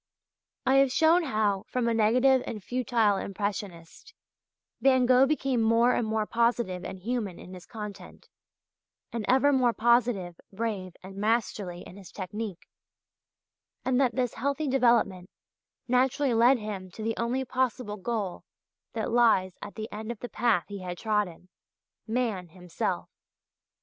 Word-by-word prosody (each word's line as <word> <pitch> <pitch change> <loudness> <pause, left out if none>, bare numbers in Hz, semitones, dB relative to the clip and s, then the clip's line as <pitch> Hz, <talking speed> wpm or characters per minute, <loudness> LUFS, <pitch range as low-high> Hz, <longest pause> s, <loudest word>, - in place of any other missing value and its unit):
I 265 +1 +4
have 275 -1 +4
shown 325 +5 +4
how, 210 -6 0
from 250 -2 -1
a 230 - +2
negative 250 +4 +4
and 210 -4 -5
futile 230 -4 +1
impressionist, 200 - -5 0.7
Van 260 -2 +4
Gogh 255 +2 +5
became 270 -5 0
more 230 +2 +4
and 225 - 0
more 220 0 0
positive 230 -6 0
and 190 - -6
human 210 -2 -3
in 185 - -11
his 180 -1 -11
content, 205 -4 -9 0.9
and 230 -2 -2
ever 275 +3 +4
more 250 -3 +3
positive, 225 -7 +1
brave 195 -4 -4
and 190 +1 -10
masterly 205 -4 -1
in 185 - -12
his 195 -3 -12
technique, 200 0 -6 1.2
and 260 +1 +2
that 250 -4 +1
this 250 -3 0
healthy 280 +2 -2
development 235 -8 +2 0.6
naturally 255 +2 +2
led 240 +4 +5
him 205 -4 -6
to 220 - -7
the 225 +1 0
only 245 +3 -1
possible 250 -4 -1
goal 205 -2 -3 0.5
that 225 -1 -2
lies 225 -6 +3
at 205 - -8
the 220 -1 -5
end 215 +2 -5
of 235 - -6
the 245 - -5
path 220 -9 +1
he 205 -1 -7
had 180 -1 -5
trodden 210 -5 -1 0.6
Man 220 -6 -1
himself. 180 0 -4
225 Hz, 145 wpm, -28 LUFS, 195-250 Hz, 1.2 s, Gogh